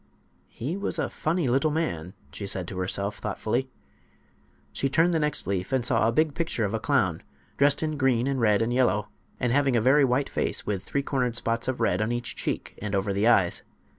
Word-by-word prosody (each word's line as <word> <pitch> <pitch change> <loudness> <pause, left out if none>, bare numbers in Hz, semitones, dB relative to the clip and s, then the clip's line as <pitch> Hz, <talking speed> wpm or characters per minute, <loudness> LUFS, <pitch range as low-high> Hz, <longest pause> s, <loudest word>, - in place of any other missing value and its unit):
"He 140 +9 -4
was 200 - -2
a - - -1
funny 165 -1 -1
little 135 +5 +2
man," 90 - -2 0.2
she 100 - -5
said 95 -3 0
to 95 - -5
herself, 100 +2 -2
thoughtfully. 110 +5 -2 1.0
She 135 - -1
turned 165 +5 +3
the 165 - +2
next 150 -1 0
leaf, 95 +2 -2
and 130 -3 +1
saw 115 -3 +2
a - - +2
big 155 +4 +2
picture 160 -9 -1
of 100 - -3
a 110 - 0
clown, 110 - +1 0.3
dressed 140 +2 +3
in 155 -1 -2
green 130 -3 +2
and 135 -2 -1
red 105 -1 +3
and 120 +2 -1
yellow, 105 -5 +2 0.3
and 120 -1 +1
having 140 -2 +3
a - - +4
very 135 +6 +5
white 130 +2 +2
face - - -2
with 100 -2 -2
three 140 - -2
cornered 125 -4 -1
spots 115 -1 -1
of 130 -1 -2
red 90 +3 +1
on 110 +2 0
each 120 0 -3
cheek - - -3
and 105 -1 -2
over 100 +1 0
the 100 +3 +2
eyes. 95 -7 +3
120 Hz, 215 wpm, -26 LUFS, 105-140 Hz, 1.0 s, very